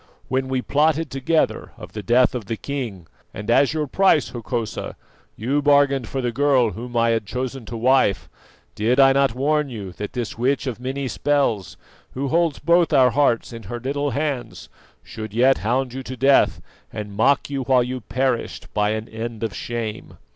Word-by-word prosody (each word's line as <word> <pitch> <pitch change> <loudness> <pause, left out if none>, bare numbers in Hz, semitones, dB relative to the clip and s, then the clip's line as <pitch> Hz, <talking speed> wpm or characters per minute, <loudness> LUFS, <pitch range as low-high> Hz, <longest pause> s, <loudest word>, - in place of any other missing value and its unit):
"When 130 +1 0
we 130 -1 -1
plotted 155 0 +1
together 145 +4 0
of - - -10
the 105 - -5
death 120 +5 +3
of 120 -5 -4
the 110 +3 -4
king, 120 -12 -5 0.3
and 105 +3 -3
as 140 +3 +4
your 155 -1 -1
price, 160 -1 +3
Hokosa, 115 -1 -4 0.4
you 135 +7 0
bargained 140 -3 +3
for 135 - -3
the 120 -1 -1
girl 130 -3 +2
whom 120 +5 -6
I 115 0 +3
had 110 -3 -1
chosen 125 +1 -4
to 115 - -5
wife, 125 -3 +2 0.5
did 120 +5 +1
I 135 -1 +7
not 135 -3 +2
warn 150 +2 +1
you 105 -6 -7
that 105 +4 -7
this 120 -2 -4
witch 135 +3 +1
of 125 -4 -4
many 135 +2 -3
spells, 120 - 0 0.4
who 135 +1 -2
holds 165 -1 +1
both 170 +2 +3
our 130 -4 +5
hearts 125 -3 +1
in 115 - -7
her 120 - -4
little 140 +3 -2
hands, 135 -3 -3 0.3
should 110 -1 -8
yet 130 +3 +4
hound 125 +3 -1
you 135 - -5
to 130 0 -7
death 135 +2 +3 0.3
and 105 -1 -6
mock 140 +6 +2
you 140 -1 -2
while 130 -1 +4
you 125 +1 -4
perished 130 +2 -2
by 105 0 +1
an 110 +1 -4
end 115 0 -6
of 110 -3 -2
shame? 115 -3 -5
130 Hz, 185 wpm, -22 LUFS, 115-140 Hz, 0.5 s, I